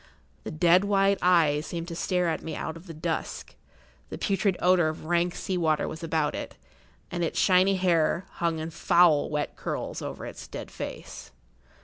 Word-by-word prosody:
The - - -4
dead 175 +4 +4
white 200 -1 +2
eyes 155 -4 +3
seemed 170 -1 -5
to 170 - -5
stare 180 0 0
at 160 - -1
me 160 - -5
out 160 - -4
of 165 +3 -13
the 165 - -7
dusk; 155 - -4 0.6
the - - -6
putrid 195 -1 0
odour 180 -2 +4
of 155 0 -5
rank 175 +1 +1
sea 185 -2 -2
water 155 -2 +1
was 160 +2 -7
about 160 -2 0
it, - - -6 0.6
and 175 -1 -2
its 165 - -2
shiny 190 +1 +4
hair 175 -1 +1 0.2
hung 170 -1 +1
in 160 +1 -5
foul 165 -2 +4
wet 150 -1 -2
curls - - -4
over - - -6
its - - -9
dead - - -8
face. - - -8
170 Hz, 180 wpm, -27 LUFS, 160-180 Hz, 0.6 s, dead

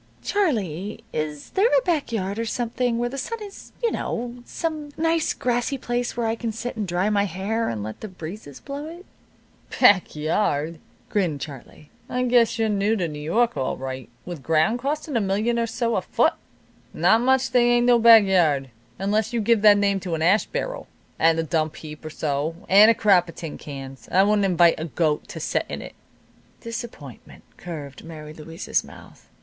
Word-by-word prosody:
"Charlie, 210 - -1
is 150 -1 -4
there 405 +5 +3
a - - +4
back 325 - 0
yard, 200 -1 -2
or 230 - -1
something, 240 +1 -1
where 240 +1 -1
the 275 +2 -5
sun 460 - -4
is, 400 -1 -11
you 465 - +2
know 240 +1 -3
some 310 -3 -4
nice, 325 0 +1
grassy 245 +3 -1
place 245 -1 -3
where 235 - 0
I 225 - +1
can 230 0 -3
sit, 240 +3 -5
and 215 -3 -3
dry 180 +3 0
my 200 -1 +2
hair, 205 +5 -2
and 110 -3 -4
let 110 +1 -7
the 215 - -5
breezes 175 -4 -9
blow 285 +2 -6
it?" 345 +3 -10 0.7
"Back 190 -5 +5
yard!" 155 0 0 0.3
grinned 175 -8 0
Charlie. 145 +1 -10 0.2
"I 250 0 -1
guess 235 -2 +3
you're 225 -1 +1
new 210 +1 +1
to 190 - -1
N' 160 -3 -3
York, 170 +12 0
all 130 - -2
right, 130 -1 -6 0.2
with 175 -5 -7
ground 160 - +2
costin' 295 +2 -3
a 230 - +2
million 210 +5 0
or 230 - 0
so 230 +1 -1
a - - +1
foot. - - +2 0.6
Not 225 - +4
much 260 +1 +2
they 240 -1 +4
ain't 240 0 +3
no 245 -1 +5
back 225 -1 +8
yard, 155 -9 +2 0.3
unless 210 +4 0
you'd 230 -2 0
give 230 0 +3
that 205 -1 +7
name 200 -1 +2
to 180 -3 -3
an 160 - -2
ash 195 +6 +3
barrel, - - -4 0.3
and 165 0 +4
a 165 - +1
dump 155 -1 -1
heap 150 -1 -10
or 155 - -6
so, 150 +1 -2
and 205 +3 +8
a 230 - +5
crop 185 -5 +4
of - - -10
tin 165 -3 -7
cans. 135 -2 -9
I 190 - +5
wouldn't 205 0 +3
invite 175 -3 +4
a 160 - -3
goat 155 -2 -1
to - - -7
set - - -1
in - - -4
it." - - -9 0.7
Disappointment 230 - -8
curved 150 -6 -8
Mary 155 -2 -9
Louise's 165 +3 -3
mouth. - - -15
205 Hz, 195 wpm, -24 LUFS, 160-240 Hz, 0.7 s, back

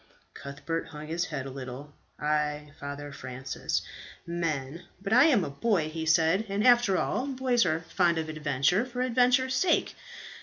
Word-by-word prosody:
Cuthbert 140 +4 -5
hung 150 -1 -9
his 165 +3 -2
head 135 -6 -5
a 135 - -6
little. 135 +2 -8 0.3
"Ay, 150 0 -1
Father 145 0 -6
Francis, 130 -1 -4 0.4
men; 165 -3 -3
but 200 +2 -2
I 250 +4 +7
am 255 - +4
a - - -4
boy," 165 +1 0
he 160 0 -4
said, 165 +6 +3
"and 200 +3 0
after 240 -6 +5
all, 260 - -1
boys 255 -5 +1
are 160 0 0
fond 170 +1 +1
of 160 -1 -2
adventure 155 - +1
for 250 0 -5
adventure's 255 +1 +3
sake. 370 - +2
165 Hz, 160 wpm, -28 LUFS, 145-225 Hz, 0.4 s, I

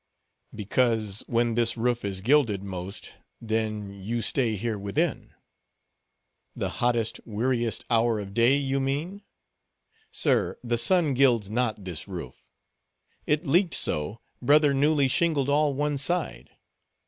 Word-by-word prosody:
"Because 110 -1 0
when 120 0 +1
this 115 0 +1
roof 120 +1 0
is 95 -2 -3
gilded 115 -5 +2
most, 95 +1 -7 0.3
then 110 -2 -2
you 110 +4 -4
stay 115 -1 0
here 110 +1 -3
within." 100 0 -2 1.2
"The - - -2
hottest, 120 -2 +1
weariest 120 +1 -1
hour 115 -1 +2
of 100 -1 -6
day, 120 +5 +4
you 135 -1 -1
mean? 150 +9 -3 0.9
Sir, - - +1
the 120 -1 0
sun 160 +3 +3
gilds 120 -6 +2
not 110 -4 -1
this 90 -1 -5
roof. 85 -10 -8 0.8
It 150 +3 +1
leaked 170 +5 +2
so, 75 +9 -1 0.2
brother 145 +2 +4
newly 145 0 +3
shingled 155 -2 +1
all 145 -1 +2
one 145 0 -1
side. 145 - -2
120 Hz, 125 wpm, -26 LUFS, 105-140 Hz, 1.2 s, day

